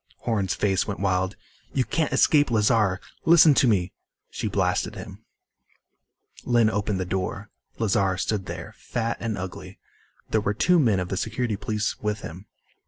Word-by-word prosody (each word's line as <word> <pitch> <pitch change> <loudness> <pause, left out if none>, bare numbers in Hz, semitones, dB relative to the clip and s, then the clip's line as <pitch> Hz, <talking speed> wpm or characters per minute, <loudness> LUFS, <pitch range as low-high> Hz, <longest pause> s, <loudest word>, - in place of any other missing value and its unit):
Horn's 100 -6 -1
face 95 -1 +1
went 100 - -4
wild. 95 0 0 0.4
"You 130 - +2
can't 160 -2 -1
escape 145 -1 +4
Lazar! 105 -4 +2 0.2
Listen 160 -2 +7
to 135 - +3
me 95 -5 +1 0.2
" - - -57
She - - -3
blasted - - 0
him. - - -10 1.2
Lynn 120 -3 +3
opened 105 -2 -1
the 95 - -2
door. 95 +3 -3 0.3
Lazar 100 -4 +1
stood 95 0 -2
there, - - -7
fat 115 -1 -3
and 115 -3 -3
ugly. 95 +1 -7 0.5
There 110 - +2
were 105 0 -1
two 180 - +3
men 110 -10 +3
of 90 0 -3
the 95 - -2
Security 110 +1 -2
Police 105 +2 -2
with 105 0 -2
him. 90 +6 -9
105 Hz, 165 wpm, -25 LUFS, 95-115 Hz, 1.2 s, Listen